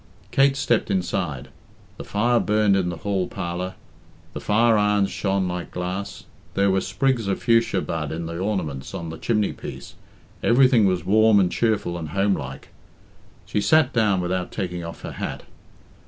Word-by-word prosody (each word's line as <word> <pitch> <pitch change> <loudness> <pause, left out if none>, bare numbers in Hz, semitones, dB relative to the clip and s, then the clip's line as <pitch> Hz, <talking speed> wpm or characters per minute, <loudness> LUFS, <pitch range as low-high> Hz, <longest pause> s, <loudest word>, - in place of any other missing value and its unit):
Kate 135 0 +3
stepped 120 -5 +1
inside. 90 -7 -2 0.5
The - - -7
fire 120 +4 +1
burned 105 -1 +2
in 95 -2 +1
the 85 - -5
hall 95 -3 0
parlour, 90 0 -4 0.6
the - - -5
fire 115 +2 +3
irons 105 -1 +2
shone 95 -2 0
like 90 -1 -4
glass, 90 +3 -5 0.3
there 100 0 +3
were 95 0 +2
sprigs 130 -6 0
of 100 - -2
fuchsia 115 -4 +3
bud 80 -3 -3
in 85 +1 -4
the 85 +1 -5
ornaments 90 -9 -3
on 85 - -5
the 80 - -8
chimneypiece 105 -3 -2 0.5
everything 125 -2 +5
was 90 -3 0
warm 110 +2 +5
and 90 -2 +2
cheerful 105 -6 0
and 80 -2 -6
homelike. 95 -7 -2 0.8
She 105 - -1
sat 155 +2 +3
down 105 -5 +2
without 90 0 -2
taking 90 -2 -4
off 85 - -8
her - - -5
hat. - - -4
95 Hz, 160 wpm, -23 LUFS, 90-110 Hz, 0.8 s, everything